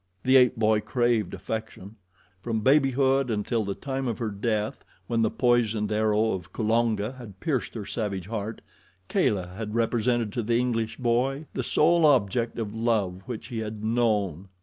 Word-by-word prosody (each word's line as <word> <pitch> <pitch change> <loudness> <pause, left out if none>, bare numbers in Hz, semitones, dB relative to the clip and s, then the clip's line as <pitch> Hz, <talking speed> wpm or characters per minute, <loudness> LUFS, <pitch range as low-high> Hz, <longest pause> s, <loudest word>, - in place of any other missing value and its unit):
The 130 +1 +4
ape 125 -1 +6
boy 110 -2 +3
craved 115 -2 0
affection. 105 +1 -6 0.5
From 110 +1 -2
babyhood 135 0 +3
until 110 +1 0
the 100 -1 -3
time 135 -1 -3
of 115 - -2
her 115 -3 -3
death, 105 +1 -2 0.2
when 115 -1 0
the 110 - +3
poisoned 115 -4 +1
arrow 110 +1 +2
of 90 -2 -5
Kulonga 110 0 +1
had 105 -6 -11
pierced 140 -9 -2
her 105 -3 -5
savage 100 -6 -3
heart, 110 +1 -5 0.5
Kala 95 -7 +1
had 105 +1 -5
represented 115 -1 +1
to 120 - -1
the 115 +1 +1
English 115 -2 -1
boy 130 +4 0
the - - -2
sole 165 +7 +3
object 115 -3 +2
of 110 -3 -3
love 110 -5 0
which 120 0 -6
he 120 -3 -4
had 110 -1 -5
known. 105 -6 0
115 Hz, 165 wpm, -26 LUFS, 105-120 Hz, 0.5 s, ape